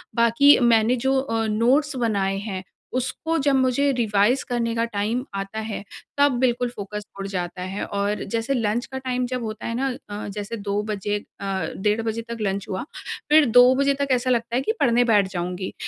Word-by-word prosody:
बाकी 235 +5 +6
मैंने 235 -1 +4
जो 270 0 +3
अ, 225 -4 -1
नोट्स 260 +7 +2
बनाए 200 -5 0
हैं, 195 -2 -5 0.3
उसको 320 +6 -2
जब 280 -1 +2
मुझे 260 +2 +2
रिवाइज़ 220 +2 +2
करने 235 -1 0
का 230 - +1
टाइम 225 +2 -2
आता 195 +2 -4
है, 220 -2 -5 0.3
तब 285 0 +5
बिल्कुल 245 -1 +1
फ़ोकस 210 -2 -7
उड़ 195 - -4
जाता 180 -2 -4
है 190 +2 -4
और 200 +1 -2
जैसे 230 +5 -2
लंच 230 -1 0
का 265 - -6
टाइम 255 -1 -2
जब 250 -1 -3
होता 215 0 -5
है 230 - -3
ना 270 +3 0 0.2
अ, 205 0 -5
जैसे 210 +3 -5
2 205 0 -2
बजे 205 0 -1 0.2
अ, - - -4 0.3
डेढ़ 210 +3 +1
बजे 225 0 -2
तक 235 - -4
लंच 200 -1 -2
हुआ। 190 +3 -3 0.5
फिर 305 0 +7
2 250 +1 +8
बजे 280 +1 +3
तक 280 - +1
ऐसा 255 0 +1
लगता 235 0 0
है 255 - +2
कि 275 - 0
पढ़ने 245 -2 +4
बैठ 205 -3 +4
जाऊँगी। 180 +1 -3
230 Hz, 195 wpm, -23 LUFS, 205-255 Hz, 0.5 s, 2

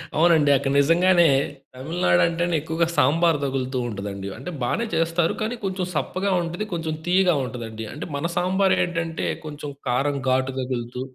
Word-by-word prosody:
అవునండి. 160 -3 +4
అక్కడ 135 0 0
నిజంగానే 175 +4 +4 0.5
'తమిళనాడు' 130 - +1
అంటేనే 170 0 0
ఎక్కువగా 160 +2 0
సాంబార్ 165 +4 +3
తగులుతూ 130 -1 -2
ఉంటదండి. 100 -1 -5
అంటే 135 +9 -7
బానే 230 - 0
చేస్తారు. 165 0 +1
కానీ 225 +3 -1
కొంచెం 190 -1 -2
సప్పగా 190 +5 -1
ఉంటది, 175 +5 -4
కొంచెం 165 -2 -2
తియ్యగా 180 -2 +4
ఉంటదండి 115 -2 -6
అంటే 150 - -6
మన 145 +4 -1
సాంబారేంటంటే 180 -3 +1 0.2
కొంచెం 150 -1 -6 0.2
కారం, 140 +3 +1
ఘాటు 130 +1 +1
తగులుతూ 125 -1 -4
160 Hz, 140 wpm, -23 LUFS, 130-175 Hz, 0.5 s, అవునండి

